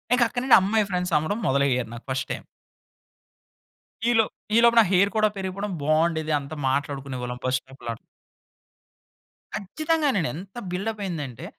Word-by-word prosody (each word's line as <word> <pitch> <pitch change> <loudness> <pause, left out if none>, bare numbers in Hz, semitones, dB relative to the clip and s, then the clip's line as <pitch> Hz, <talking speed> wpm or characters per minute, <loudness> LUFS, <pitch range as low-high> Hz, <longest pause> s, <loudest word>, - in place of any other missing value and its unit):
ఇంక 250 - 0
అక్కడినుండి 245 +2 +5
అమ్మాయి 210 +2 +2
ఫ్రెండ్స్ 180 -1 -1
అవడం 155 +9 -1
మొదలయ్యారు 130 -4 +1
నాకు 115 - -9
ఫస్ట్ 130 - -2
టైమ్. - - -7 1.7
ఈ‌లో‌ప్ 225 -2 +3 0.2
ఈలోపు 235 0 +6
నా - - +8
హెయిర్ 195 +2 +4
కూడా 215 0 +4
పెరిగిపోవడం 195 +2 -3
బాగుండేది! 155 +1 +1
అంతా 140 +2 -8
మాట్లాడుకునేవాళ్ళం 135 -3 -3
బస్ 130 0 +2
స్టాప్‌లో‌. 125 -3 -8 1.6
కచ్చితంగానండి! 280 - 0
ఎంత 190 +5 -10
బిల్డప్ 210 +4 -3
అయిందంటే, 145 -9 -5
180 Hz, 125 wpm, -25 LUFS, 140-215 Hz, 1.7 s, నా